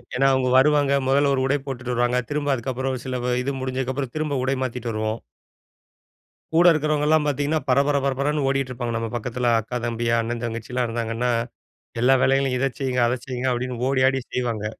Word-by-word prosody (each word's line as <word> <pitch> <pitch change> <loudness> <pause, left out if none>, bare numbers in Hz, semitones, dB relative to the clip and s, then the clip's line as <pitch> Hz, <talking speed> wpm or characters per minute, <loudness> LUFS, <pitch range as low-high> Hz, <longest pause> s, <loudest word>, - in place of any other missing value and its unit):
ஏன்னா 135 +2 +3
அவங்க 130 -1 +1
வருவாங்க. 145 0 +4
முதல்ல 140 +1 +3
ஒரு 130 - +1
உடை 140 +2 +2
போட்டுட்டு 130 -2 -4
வருவாங்க. 120 +1 +1
திரும்ப 145 -1 0
அதுக்கப்புறம் 130 +1 -3
சில 130 -1 -3
வ 125 0 +1
இது 140 +2 -2
முடிஞ்சதுக்கப்புறம் 130 0 -3
திரும்ப 150 -3 -1
உடை 135 +1 +1
மாத்திட்டு 125 -2 -3
வருவோம். 110 +1 -2 1.3
கூட 170 +2 +5
இருக்கிறவங்கலாம் 155 0 +2
பார்த்திங்கன்னா 145 +2 0
பரபர 140 +2 +3
பரபரன்னு 140 +2 0
ஓடிட்டு 135 -1 0
இருப்பாங்க 120 -2 -3
நம்ம 115 -1 -3
பக்கத்தில. 120 +1 -1
அக்கா, 120 +3 -4
தம்பி, 120 0 -2
அண்ணன், 115 +1 -3
தங்கச்சிலாம் 120 +2 -2
இருந்தாங்கன்னா, 115 +1 -1 0.7
எல்லா 130 +2 +5
வேலைகளையும் 135 -1 +2
இத 135 -1 +1
செய்யுங்க, 130 -2 0
அத 125 - 0
செய்யுங்க 130 0 -2
அப்படின்னு 125 0 -3
ஓடி 135 -1 +1
ஆடி 135 0 -1
செய்வாங்க. 115 -4 -2
130 Hz, 170 wpm, -23 LUFS, 120-140 Hz, 1.3 s, கூட